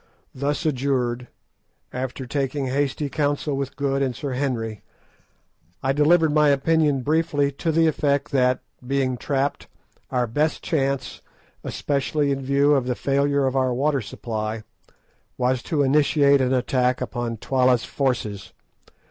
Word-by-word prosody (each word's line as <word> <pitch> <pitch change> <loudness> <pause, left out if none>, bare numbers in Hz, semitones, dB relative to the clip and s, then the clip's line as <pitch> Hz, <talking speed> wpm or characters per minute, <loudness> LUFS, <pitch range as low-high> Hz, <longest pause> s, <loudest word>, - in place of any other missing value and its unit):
Thus 145 +4 -2
adjured, 125 -4 0 0.7
after 130 +1 -4
taking 140 +1 -2
hasty 140 +2 -1
counsel 145 0 -1
with 135 -1 -4
Good 140 -1 0
and 130 -3 0
Sir 140 +3 -4
Henry, 120 -5 -2 1.0
I 135 +1 +2
delivered 155 +2 +4
my 150 -1 +4
opinion 145 -1 +2
briefly 150 -1 +1
to 160 +4 -2
the 165 +1 +3
effect 145 -3 +1
that, 125 -2 +2 0.2
being 130 0 0
trapped, 140 +3 -2 0.4
our 125 -1 +1
best 150 +7 -1
chance, 140 -4 -1 0.4
especially 145 0 -1
in 135 0 -1
view 140 +2 +3
of 135 -3 +1
the 125 - 0
failure 140 +1 +1
of 130 0 -1
our 130 -2 +1
water 140 +1 +1
supply, 110 0 -4 0.7
was 125 0 +1
to 145 +1 0
initiate 140 0 +4
an 130 0 +1
attack 125 0 +1
upon 120 -2 -3
Twala's 125 0 +2
forces. 115 -7 -2
135 Hz, 135 wpm, -23 LUFS, 125-145 Hz, 1.0 s, delivered